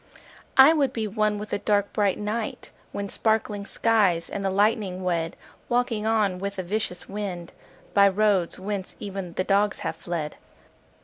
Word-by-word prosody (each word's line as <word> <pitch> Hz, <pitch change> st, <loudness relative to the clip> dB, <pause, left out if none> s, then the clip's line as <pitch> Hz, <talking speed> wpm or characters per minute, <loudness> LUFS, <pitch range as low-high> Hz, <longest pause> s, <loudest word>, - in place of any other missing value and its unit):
I 270 Hz, +4 st, +9 dB
would 280 Hz, -5 st, +1 dB
be 220 Hz, -2 st, -2 dB
one 215 Hz, 0 st, 0 dB
with 210 Hz, +1 st, -6 dB
the -, -, -1 dB
dark 205 Hz, 0 st, +1 dB
bright 200 Hz, -2 st, +2 dB
night 215 Hz, +2 st, -4 dB, 0.2 s
When 200 Hz, 0 st, -4 dB
sparkling 210 Hz, -1 st, 0 dB
skies 200 Hz, -7 st, +2 dB
and 200 Hz, -, -3 dB
the 195 Hz, -, +1 dB
lightning 200 Hz, -2 st, +1 dB
wed— 170 Hz, -2 st, -1 dB, 0.3 s
Walking 240 Hz, -3 st, +1 dB
on 210 Hz, -5 st, +2 dB
with 200 Hz, +1 st, -3 dB
the 185 Hz, -, -3 dB
vicious 180 Hz, -1 st, -3 dB
wind 190 Hz, -4 st, -5 dB, 0.4 s
By 200 Hz, -1 st, +7 dB
roads 195 Hz, -3 st, +1 dB
whence 195 Hz, 0 st, -4 dB
even 195 Hz, -4 st, -5 dB
the 185 Hz, -, 0 dB
dogs 200 Hz, +2 st, +1 dB
have -, -, -2 dB
fled. 165 Hz, -4 st, -4 dB
205 Hz, 165 wpm, -25 LUFS, 185-215 Hz, 0.4 s, I